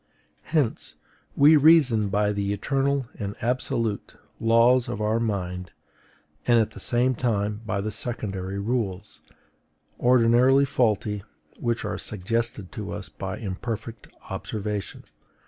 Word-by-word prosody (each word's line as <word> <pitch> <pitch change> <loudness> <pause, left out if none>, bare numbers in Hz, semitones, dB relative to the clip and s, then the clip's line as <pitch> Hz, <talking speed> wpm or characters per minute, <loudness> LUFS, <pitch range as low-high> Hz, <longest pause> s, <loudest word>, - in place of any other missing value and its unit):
Hence 150 -8 -1 0.4
we 150 +3 +7
reason 140 -9 +5
by 105 +1 +1
the 100 0 -1
ETERNAL 135 +5 0
and 100 -1 -4
ABSOLUTE 120 -3 -1 0.2
laws 115 +2 +4
of 105 - -4
our 110 +1 +1
mind, 90 -5 -3 0.8
and 120 -1 +5
at 110 - +1
the - - -11
same 125 +2 +1
time 105 -3 -1
by 100 - -1
the 110 +2 -3
secondary 100 -4 -4
rules, 105 -2 -3 0.8
ordinarily 125 +3 +5
faulty, 105 -5 0 0.4
which 120 -2 -1
are 100 -1 -3
suggested 110 0 -3
to - - -6
us - - -6
by - - -6
imperfect 110 +3 -5 0.2
observation. 105 -1 -4
115 Hz, 120 wpm, -25 LUFS, 100-125 Hz, 0.8 s, we